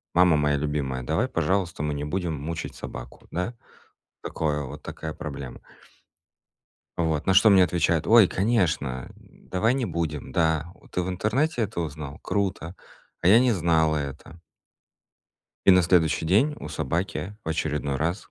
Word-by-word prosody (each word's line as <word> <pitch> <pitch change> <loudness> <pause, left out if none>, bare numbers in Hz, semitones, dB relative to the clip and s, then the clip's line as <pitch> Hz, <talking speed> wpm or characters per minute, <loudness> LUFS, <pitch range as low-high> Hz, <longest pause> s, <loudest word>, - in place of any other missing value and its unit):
"Мама 90 -2 +5
моя 75 -1 +2
любимая, 70 -3 -2
давай, 80 - 0
пожалуйста, 85 - -1
мы 75 -1 -1
не 70 0 -4
будем 85 +1 -2
мучить 80 +3 -5
собаку", - - -9
да, 90 +7 -2 0.7
Такое 75 -2 -2
вот, 65 - -9
такая 80 -1 -6
проблема. 70 -4 -7 1.4
Вот 80 -3 -1
на 95 - +3
что 105 +3 +7
мне 95 -2 +7
отвечают: 85 -2 +1
"Ой, 115 -3 +7
конечно, 85 - 0
давай 110 +6 -2
не 130 -2 -1
будем. 80 -5 -3
Да, 80 0 +1 0.2
ты 90 - 0
в 90 - -4
интернете 120 - 0
это 105 -4 -3
узнал? 75 -2 -6
Круто. 95 -4 -2 0.5
А - - -1
я 105 +4 +8
не 125 0 +3
знала 80 -4 +2
это". 70 +3 -6 1.3
И 95 - +9
на 90 0 +5
следующий 85 -2 +2
день 110 - +3
у - - -6
собаки 90 +6 -3
в - - -5
очередной 75 -3 -1
раз 85 +7 -3
85 Hz, 150 wpm, -25 LUFS, 75-95 Hz, 1.4 s, И